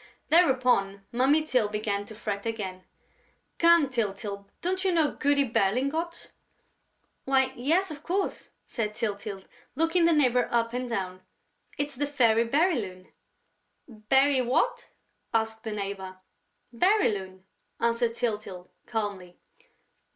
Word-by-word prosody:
Thereupon 250 - +3
Mummy 270 +6 +3
Tyl 255 -8 +1
began 205 -1 -2
to 220 - -10
fret 205 -1 -4
again: 190 -5 -5 0.7
"Come, 335 -3 +6
Tyltyl, 200 -4 -3
don't 375 +2 -1
you 380 - +2
know 320 -4 +2
Goody 285 -1 +2
Berlingot?" 275 - -1 0.9
"Why, 265 -1 +2
yes, 325 +9 +1
of 295 -1 -8
course," 375 +5 -2 0.2
said 215 -3 -3
Tyltyl, 200 -3 -4 0.3
looking 330 +3 +2
the 335 - +5
neighbor 250 -6 +3
up 230 0 +1
and 250 0 -3
down. 185 -4 -3 0.6
"It's 290 0 -2
the 290 +3 -1
Fairy 235 -5 +3
Bérylune." 235 - 0 0.8
"Béry... 265 +4 +2
what?" 265 - 0 0.5
asked 220 0 -1
the 220 - -4
neighbor. 195 -2 -5 0.6
"Bérylune," 210 - +1 0.4
answered 235 0 +1
Tyltyl, 210 -6 -3 0.2
calmly. 200 -6 -4
235 Hz, 115 wpm, -27 LUFS, 205-285 Hz, 0.9 s, Come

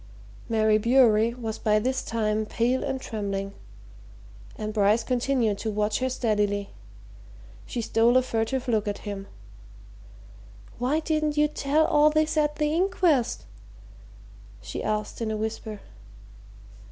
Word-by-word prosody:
Mary 215 -1 +3
Bewery 235 -1 +4
was 225 -3 -5
by 215 -1 +2
this 255 +5 0
time 215 -1 -1
pale 245 +4 0
and 265 - -2
trembling 200 -4 -4 1.0
and 215 0 -5
Bryce 210 +2 +3
continued 245 -4 0
to 220 - -3
watch 210 0 0
her 260 0 0
steadily. 210 -5 -1 1.0
She 240 - -3
stole 230 +2 +3
a 255 - +3
furtive 245 +2 -2
look 220 -3 +1
at 205 +1 -4
him. 200 -1 -5 1.5
"Why 270 +6 +1
didn't 310 -1 -1
you 300 0 +4
tell 300 +1 +1
all 300 0 +4
this 310 +1 +1
at 300 -1 +1
the 300 0 0
inquest?" 345 -7 +1 1.1
she - - -6
asked 215 +1 -3
in 225 - -1
a 215 - -2
whisper. 220 -1 -5
230 Hz, 130 wpm, -26 LUFS, 215-270 Hz, 1.5 s, Bewery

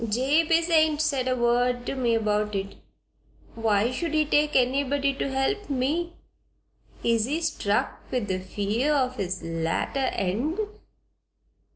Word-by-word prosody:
"Jabez 310 +8 +2
ain't 310 -2 +4
said 280 -5 0
a 255 - +1
word 245 0 +1
to - - -2
me 245 -4 +1
about 210 -1 0
it. 195 0 -3 0.8
Why 225 0 +1
should 315 +4 -2
he 305 0 +3
take 295 0 +2
anybody 275 +2 +2
to 275 - -3
help 270 +11 -1
me? 295 +6 -1 0.9
Is 230 -2 +2
he 295 +6 -1
struck 315 -11 -1
with 245 -5 -2
the 185 -1 -1
fear 210 +9 -1
o' 260 -3 +2
his 190 -7 -4
latter 165 +11 -1
end?" 230 - -1
255 Hz, 140 wpm, -26 LUFS, 215-295 Hz, 0.9 s, ain't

